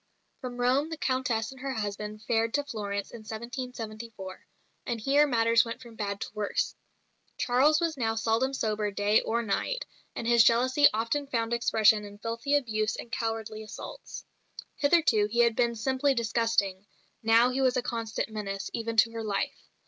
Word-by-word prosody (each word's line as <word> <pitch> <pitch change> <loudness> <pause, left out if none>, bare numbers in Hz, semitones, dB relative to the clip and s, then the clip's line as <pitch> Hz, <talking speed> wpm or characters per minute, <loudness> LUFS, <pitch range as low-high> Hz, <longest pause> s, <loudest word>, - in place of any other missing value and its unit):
From 250 -2 -6
Rome 255 +5 +2
the 320 - -5
Countess 255 -5 -1
and 265 -1 -12
her 270 0 -3
husband 210 0 -4
fared 225 0 +1
to 290 - +1
Florence 205 -7 -4
in 235 - -9
1774; 225 -3 -7 0.4
and 235 -3 -2
here 285 +6 +4
matters 230 -2 +4
went 230 +1 -6
from 240 -3 -12
bad 200 -1 -3
to - - -4
worse. 210 -1 -1 0.6
Charles 270 +5 +3
was 330 -3 -1
now 225 -3 0
seldom 225 +4 +1
sober 215 -5 -1
day 205 +1 +2
or 235 +1 -1
night; - - -1 0.3
and 230 - -4
his 235 -1 +6
jealousy 255 +5 +5
often 230 +7 -1
found 230 -3 -1
expression 220 -2 +4
in 205 0 -10
filthy 230 +6 -1
abuse 215 -5 0
and 235 - -8
cowardly 225 -3 -3
assaults. 220 - -9 0.5
Hitherto 285 -9 +3
he 235 +3 +2
had 235 -1 +3
been 235 -1 +1
simply 265 +4 +1
disgusting; 225 -4 0 0.3
now 230 +2 +5
he 265 +2 -1
was 255 -1 +3
a 250 - 0
constant 230 -3 -3
menace, 195 -2 -5
even 230 0 -3
to 230 +1 +5
her 230 -1 -5
life. 200 -2 -3
230 Hz, 170 wpm, -28 LUFS, 215-255 Hz, 0.6 s, his